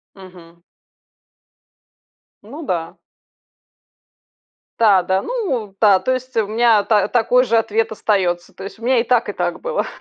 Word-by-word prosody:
Мгм. 175 -3 -16 1.8
Ну 270 +10 -10
да. 165 -5 -3 1.8
Да-да, 190 -3 +3
ну 265 - -3
да, 200 -4 +5
то 260 - -1
есть 255 -1 -5
у 220 -3 +1
меня 225 -1 +3
та 205 -1 +2
такой 245 +1 +2
же 230 -2 +1
ответ 225 0 0
остается. 185 -5 -1
То 190 - -11
есть 200 - -9
у - - -10
меня 255 0 +2
и 230 - +1
так, 245 -1 +1
и - - -2
так - - -3
было. - - -2
220 Hz, 145 wpm, -19 LUFS, 190-245 Hz, 1.8 s, да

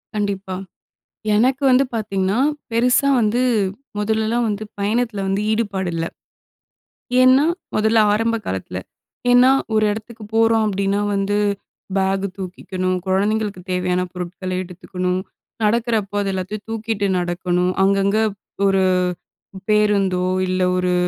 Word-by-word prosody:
கண்டிப்பா. 200 -2 -2 0.8
எனக்கு 255 +6 +2
வந்து 255 +2 +5
பார்த்தீங்கன்னா, 200 -1 0 0.3
பெருசா 245 +4 +3
வந்து 225 +3 +1 0.6
மொதலெல்லாம் 220 +3 0
வந்து 210 0 -3 0.2
பயணத்தில 215 0 0
வந்து 195 +1 0
ஈடுபாடு 200 -5 -1
இல்ல. 165 0 -1 1.2
ஏன்னா 260 +3 +6 0.3
மொதல்ல 220 +1 +3
ஆரம்ப 225 +2 +1
காலத்தில. 95 0 -4 0.5
ஏன்னா, 250 +2 +7 0.2
ஒரு 215 0 +3
எடத்துக்கு 220 +1 -7
போறோம் 225 0 +4
அப்டின்னா, 200 0 0
வந்து 200 +1 0 0.6
பேக் 195 0 +1
தூக்கிக்கணும், 185 0 -3
கொழந்தைங்களுக்கு 205 +1 0
தேவையான 180 0 0
பொருட்கள 180 +1 -5
எடுத்துக்கணும், 180 0 -3 0.4
நடக்கிறப்ப 215 -2 +1
அது 200 - -1
எல்லாத்தையும் 190 +3 -4
தூக்கிட்டு 220 -2 -1
நடக்கணும். 180 0 0
அங்கங்க 195 +1 +2 0.5
ஒரு 195 -1 +3 0.9
பேருந்தோ 200 -4 +2 0.2
இல்ல, 185 0 0 0.2
ஒரு 180 0 +1
200 Hz, 110 wpm, -20 LUFS, 185-220 Hz, 1.2 s, ஏன்னா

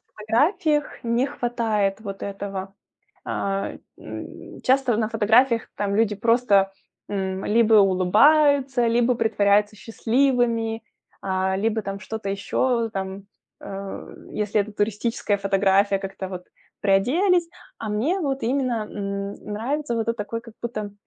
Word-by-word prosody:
фотографиях 295 - +1
не 235 +3 +1
хватает 225 -7 -1
вот 200 -3 -7
этого. 195 -1 -5 0.5
А, 195 0 -2 0.3
м, - - -9
часто 260 -3 +3
на 220 -1 0
фотографиях 230 +2 +3
там 200 -1 -1
люди 220 -2 +2
просто, 210 -3 +3 0.4
м, 190 -1 -3
либо 225 0 +4
улыбаются, 245 +7 +4
либо 240 +2 +3
притворяются 210 -2 +2
счастливыми, 230 -1 0 0.4
а, 190 0 0
либо 220 +2 0
там 195 0 -5
что-то 220 +1 -5
еще, 230 +4 0
там, 195 -1 -5 0.4
э, 195 0 -7 0.2
если 210 0 0
это 210 +1 -10
туристическая 210 0 -1
фотография, 195 0 +2
как-то 195 -1 -6
вот 180 -1 -7 0.4
приоделись. 330 - +3 0.3
А 220 - -5
мне 285 - 0
вот 275 -3 -2
именно, 245 -3 0
м, 200 0 -4 0.2
нравится 260 +5 -2
вот 225 - -1
эт 230 - 0
такой 230 +1 -4
как 230 -1 -14
будто 215 -3 -4
220 Hz, 125 wpm, -23 LUFS, 200-240 Hz, 0.5 s, либо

